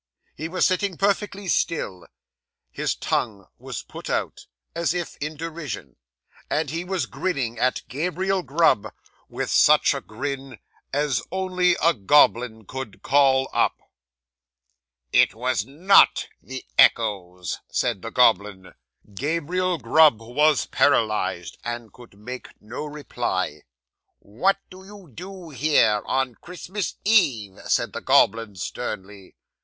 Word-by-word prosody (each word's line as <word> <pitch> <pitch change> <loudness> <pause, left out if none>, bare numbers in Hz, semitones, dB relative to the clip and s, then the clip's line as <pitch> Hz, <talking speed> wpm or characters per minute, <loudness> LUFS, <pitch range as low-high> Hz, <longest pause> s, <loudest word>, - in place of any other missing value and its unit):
He 160 +3 -5
was 185 +2 +1
sitting 185 -1 0
perfectly 200 0 -1
still; 100 - -1 0.6
his - - -2
tongue 100 -3 -2
was - - -6
put - - -9
out, - - -3 0.3
as 170 +1 -1
if 175 -1 -4
in 150 +1 -5
derision; 145 - -6 0.5
and 155 0 -1
he 165 +2 -3
was 185 0 -2
grinning 130 -11 -3
at 130 +1 +1
Gabriel 180 +6 -1
Grub 135 - +2 0.4
with - - -4
such - - +5
a - - -4
grin 135 +2 -6 0.3
as 145 -2 0
only 185 -1 +1
a 170 +1 +5
goblin 110 -1 +3
could 130 -2 -8
call 135 -1 +4
up. - - +2 1.4
'"It - - +4
was 125 -3 -1
_not 175 +10 +4 0.2
_the 130 0 -7 0.2
echoes," 90 -5 +2
said 120 -6 -1
the 115 - -5
goblin. 105 -6 +2 0.4
'Gabriel 170 - -1
Grub 150 -1 +5
was 145 +6 +2
paralysed, 105 - +1
and 120 -2 -5
could 120 -5 -16
make 125 +5 -9
no 120 +7 -7
reply. 150 -1 -3 0.6
'"What 155 - 0
do 185 +1 -12
you 195 -5 -14
do 180 - -9
here 135 -6 +3
on 130 -2 0
Christmas 180 +3 -5
Eve?" 125 - +2
said - - +1
the - - -5
goblin 110 -1 +3
sternly. 95 +2 -6
135 Hz, 125 wpm, -24 LUFS, 110-170 Hz, 1.4 s, such